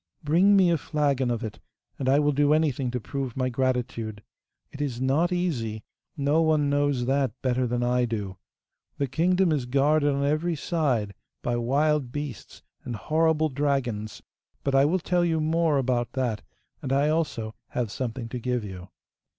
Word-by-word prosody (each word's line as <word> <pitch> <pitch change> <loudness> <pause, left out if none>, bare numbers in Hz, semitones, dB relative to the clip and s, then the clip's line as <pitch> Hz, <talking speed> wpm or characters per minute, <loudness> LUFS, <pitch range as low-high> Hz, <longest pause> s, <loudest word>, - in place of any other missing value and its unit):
Bring 175 +7 +4
me 185 -3 +5
a 165 - +1
flagon 140 -5 0
of 120 -2 -2
it, 110 -1 -6 0.4
and 130 - 0
I 135 - +5
will 150 0 +3
do 145 +1 +3
anything 140 -5 0
to 125 +1 -2
prove 135 +1 -5
my 130 -1 +1
gratitude. 125 -4 -2 0.5
It 145 - -7
is 130 -5 -2
not 140 +7 +2
easy! 120 - -2 0.3
no 145 +3 +2
one 155 -3 +2
knows 145 -3 +1
that 135 -3 0
better 130 -1 +1
than 120 +1 -1
I 125 0 +2
do! 105 -5 -4 0.6
The 140 - +1
kingdom 175 +6 +2
is 140 -5 0
guarded 145 +3 +3
on 140 0 0
every 155 +4 0
side 140 - -1 0.3
by 120 - 0
wild 140 +2 +1
beasts 145 -6 -7 0.2
and 120 -2 -4
horrible 155 +7 +1
dragons; 130 -6 -2 0.4
but 140 - 0
I 135 +1 +5
will 165 +6 +2
tell 180 0 +1
you 165 -2 +1
more 160 -1 +2
about 125 -2 0
that, 125 -6 -1 0.4
and 130 - -4
I 140 +2 +3
also 140 -9 -1
have 120 -4 -3
something 120 0 -4
to 125 - -4
give 125 -1 -1
you. 95 -2 -8
135 Hz, 175 wpm, -26 LUFS, 120-155 Hz, 0.6 s, me